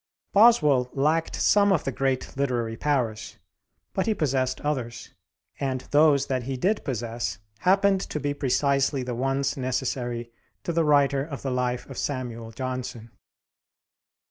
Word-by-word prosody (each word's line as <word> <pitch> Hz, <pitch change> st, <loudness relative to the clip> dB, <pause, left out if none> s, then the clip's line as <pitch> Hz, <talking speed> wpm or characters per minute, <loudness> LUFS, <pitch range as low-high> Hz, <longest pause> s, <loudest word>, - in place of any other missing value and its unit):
Boswell 150 Hz, -, +5 dB
lacked 155 Hz, +4 st, +1 dB
some 205 Hz, -1 st, +4 dB
of 185 Hz, -, +2 dB
the 135 Hz, -, -2 dB
great 135 Hz, -1 st, -1 dB
literary 120 Hz, -5 st, -1 dB
powers, 125 Hz, -5 st, -1 dB, 0.6 s
but 190 Hz, -, -1 dB
he 220 Hz, -, +2 dB
possessed 130 Hz, -5 st, 0 dB
others, 130 Hz, -6 st, -3 dB, 0.5 s
and 130 Hz, -2 st, -1 dB
those 145 Hz, -2 st, +5 dB
that 130 Hz, -2 st, -1 dB
he 130 Hz, +2 st, -4 dB
did 200 Hz, +10 st, 0 dB
possess 120 Hz, -4 st, -3 dB, 0.2 s
happened 195 Hz, +1 st, +3 dB
to 150 Hz, -, -4 dB
be 145 Hz, -1 st, -1 dB
precisely 140 Hz, 0 st, +1 dB
the 125 Hz, 0 st, -4 dB
ones 135 Hz, +3 st, 0 dB
necessary 125 Hz, -2 st, -2 dB, 0.3 s
to 170 Hz, -, -2 dB
the 165 Hz, 0 st, +2 dB
writer 140 Hz, -2 st, +3 dB
of 145 Hz, -2 st, -7 dB
the 135 Hz, -, -2 dB
life 125 Hz, -1 st, -1 dB
of 135 Hz, -, -7 dB
Samuel 120 Hz, -5 st, -4 dB
Johnson. 125 Hz, -1 st, -5 dB
135 Hz, 145 wpm, -26 LUFS, 125-150 Hz, 0.6 s, Boswell